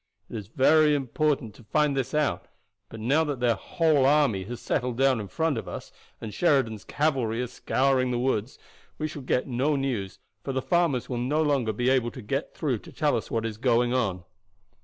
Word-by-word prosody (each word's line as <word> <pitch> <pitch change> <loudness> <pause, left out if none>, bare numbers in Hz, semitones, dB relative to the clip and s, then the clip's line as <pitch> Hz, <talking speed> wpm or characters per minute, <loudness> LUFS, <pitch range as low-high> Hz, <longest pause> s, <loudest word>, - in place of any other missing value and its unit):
It - - -6
is 105 -4 -6
very 150 +5 +4
important 140 -3 -1
to 120 - -16
find 145 +6 +1
this 135 +1 -2
out; 150 -1 0 0.4
but 115 - -9
now 135 +9 +2
that 145 -5 -3
their 120 -1 +3
whole 155 - +1
army 140 -10 +3
has 120 +3 -6
settled 125 -3 -2
down 135 -2 +3
in 105 - -5
front 160 - 0
of - - -9
us, - - -7 0.3
and 110 -2 -7
Sheridan's 130 - +1
cavalry 130 -7 0
are 125 - 0
scouring 130 +1 +1
the 125 - 0
woods, 120 -1 -1 0.4
we 155 - -2
shall 150 -2 -7
get 125 -1 0
no 135 +4 +1
news, 125 -9 -2 0.3
for 135 - -3
the 130 - 0
farmers 170 -8 +1
will 125 -2 -3
no 145 +6 +1
longer 140 -7 +1
be 120 +4 +1
able 125 -3 +2
to 130 - -10
get 105 - -3
through - - -1
to - - -14
tell - - +1
us - - -3
what 115 -1 -1
is 110 -2 -4
going 120 0 +2
on. 100 -8 0
130 Hz, 205 wpm, -26 LUFS, 115-145 Hz, 0.4 s, very